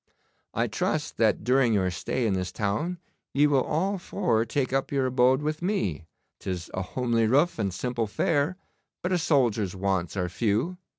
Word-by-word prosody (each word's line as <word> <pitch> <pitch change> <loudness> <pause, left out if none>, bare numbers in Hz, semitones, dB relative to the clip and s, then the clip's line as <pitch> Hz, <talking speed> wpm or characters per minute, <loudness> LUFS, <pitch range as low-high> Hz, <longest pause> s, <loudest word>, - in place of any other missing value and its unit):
'I - - +2
trust - - -2
that - - +2
during 125 0 +3
your 95 -2 +1
stay 120 +7 -2
in 105 - +2
this 90 -1 -2
town 110 - -1 0.4
ye 145 +2 +5
will 140 -3 +3
all 190 +9 -1
four 175 - 0
take 130 +1 -1
up 135 0 0
your 135 -2 +1
abode 130 +2 +3
with 155 +1 -2
me. 105 - -1 0.3
'Tis 90 -3 -5
a 95 - -2
homely 115 +3 0
roof 145 +5 +2
and 100 -3 0
simple 120 +4 -2
fare, 145 - 0 0.5
but 180 - -1
a 180 - +2
soldier's 115 - +1
wants 95 -1 -1
are 90 -1 0
few. 115 - -1
125 Hz, 175 wpm, -27 LUFS, 100-145 Hz, 0.5 s, ye